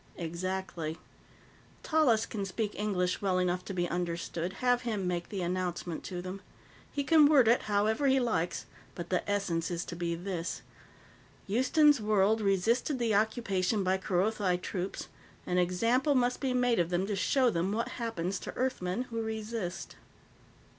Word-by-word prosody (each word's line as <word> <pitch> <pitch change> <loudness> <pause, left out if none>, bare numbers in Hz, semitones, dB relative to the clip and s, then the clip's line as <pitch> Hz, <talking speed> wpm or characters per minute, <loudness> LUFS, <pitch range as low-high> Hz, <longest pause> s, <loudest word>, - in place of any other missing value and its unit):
"Exactly. 170 -1 -4 0.9
Tallis 270 -9 +3
can 205 -3 -4
speak 210 +2 -2
English 185 -4 -1
well 190 -2 +1
enough 180 0 0
to - - -5
be 175 -2 -1
understood. 175 0 -3
Have 245 +4 +1
him 215 -6 -2
make 175 -1 -2
the 195 -3 -3
announcement 175 -1 -3
to 180 -2 -5
them. 185 +2 -6 0.5
He 285 - -1
can 310 0 +6
word 280 -6 +5
it 235 +2 +5
however 215 +6 +2
he 265 0 +4
likes, 180 -9 -1 0.3
but 175 -1 -6
the 180 - +1
essence 195 -5 0
is 170 -1 -3
to 170 - -6
be 170 0 -2
this: 175 -1 -4 0.8
Houston's 260 +5 +4
World 210 +1 +3
resisted 220 +8 +1
the 235 -3 +1
occupation 205 -2 +1
by 190 +1 +1
Kerothi 190 0 +1
troops; 180 +1 -4 0.4
an 180 0 +1
example 230 - +2
must 250 -1 +2
be 265 -2 -1
made 245 -3 +2
of 170 -1 +1
them 180 +1 0
to 205 0 -2
show 250 +5 +2
them 175 +2 0
what 230 +3 -1
happens 195 -5 -2
to - - -7
Earthmen 245 -4 -1
who 230 0 -2
resist." 220 -4 -4
195 Hz, 160 wpm, -30 LUFS, 180-230 Hz, 0.9 s, can